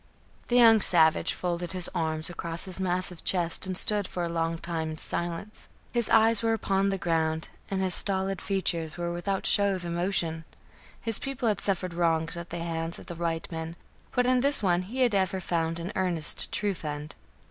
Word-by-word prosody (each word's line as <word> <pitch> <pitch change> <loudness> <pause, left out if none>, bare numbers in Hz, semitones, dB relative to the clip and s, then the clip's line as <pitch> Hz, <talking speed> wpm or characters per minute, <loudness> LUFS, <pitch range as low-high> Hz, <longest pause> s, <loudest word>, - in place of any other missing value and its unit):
The 240 - +1
young 225 -3 +7
savage 160 -4 +4
folded 175 0 -3
his 180 -2 -2
arms 160 -2 -1
across 170 -1 -4
his 190 -1 -7
massive 180 -2 -1
chest 175 0 +1
and 185 -1 0
stood 205 -1 +2
for 175 - -3
a 170 - -1
long 165 0 -1
time 165 -1 -3
in 155 - -5
silence. 170 +6 -4 0.2
His 235 -2 -1
eyes 225 -1 +5
were 225 0 +2
upon 195 -2 +1
the 195 - 0
ground, 160 -2 0 0.2
and 190 -1 -1
his 185 -1 0
stolid 195 -1 0
features 170 -5 -1
were 170 0 -2
without 190 +3 -2
show 200 -1 +4
of 180 -1 -6
emotion. 170 -2 0 0.6
His 225 -2 -4
people 270 -3 -2
had 210 - 0
suffered 185 -3 -1
wrongs 165 -1 +1
at 170 0 -7
the 175 - -5
hands 165 0 -2
of - - -11
the 175 - -6
white 165 0 -3
men; 165 0 -5 0.4
but 250 - +2
in 255 0 +4
this 280 -2 +4
one 175 -2 +3
he 235 +8 -4
had 245 -4 +4
ever 190 -1 +1
found 165 -2 -1
an 170 +4 -4
earnest, 175 -4 +1
true 205 -1 0
friend. 150 -3 -6
175 Hz, 195 wpm, -28 LUFS, 165-195 Hz, 0.6 s, young